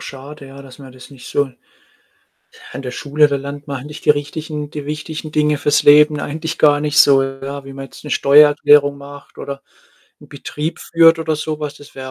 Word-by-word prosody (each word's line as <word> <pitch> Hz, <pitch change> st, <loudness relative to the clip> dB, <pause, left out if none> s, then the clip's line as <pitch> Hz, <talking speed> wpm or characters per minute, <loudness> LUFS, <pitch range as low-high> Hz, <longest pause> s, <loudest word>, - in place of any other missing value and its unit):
schade, 140 Hz, +1 st, -10 dB
ja, 135 Hz, +1 st, -12 dB
dass 130 Hz, -2 st, -15 dB
man 135 Hz, -2 st, -13 dB
das 130 Hz, +1 st, -15 dB
nicht 135 Hz, -3 st, -14 dB
so 145 Hz, -2 st, -1 dB, 1.2 s
an -, -, -6 dB
der 125 Hz, -, -6 dB
Schule, 150 Hz, +3 st, +1 dB
da 140 Hz, -, -2 dB
lernt 140 Hz, +1 st, -8 dB
man 140 Hz, -1 st, -4 dB
halt 130 Hz, -, -10 dB
nicht 150 Hz, -, -11 dB
die -, -, +1 dB
richtigen 150 Hz, 0 st, -2 dB
die 150 Hz, -2 st, -7 dB
wichtigen 155 Hz, +1 st, -6 dB
Dinge 150 Hz, -1 st, +1 dB
fürs 145 Hz, +1 st, +1 dB
Leben 150 Hz, 0 st, +5 dB
eigentlich 160 Hz, +3 st, -5 dB
gar 145 Hz, -1 st, +4 dB
nicht 150 Hz, -1 st, -2 dB
so, 135 Hz, -1 st, +6 dB
ja, 135 Hz, +1 st, -6 dB
wie 135 Hz, -, -10 dB
man 135 Hz, 0 st, -8 dB
jetzt -, -, -15 dB
'ne 150 Hz, -, -8 dB
Steuererklärung 145 Hz, 0 st, +4 dB
macht 140 Hz, 0 st, -13 dB
oder 140 Hz, 0 st, -7 dB, 0.6 s
'n -, -, -17 dB
Betrieb 155 Hz, +3 st, -6 dB
führt 165 Hz, 0 st, +4 dB
oder 160 Hz, -1 st, -2 dB
so 155 Hz, 0 st, -4 dB
was. 150 Hz, -2 st, -5 dB
Das 145 Hz, -, -16 dB
wäre 130 Hz, -1 st, -8 dB
145 Hz, 210 wpm, -17 LUFS, 140-150 Hz, 1.2 s, so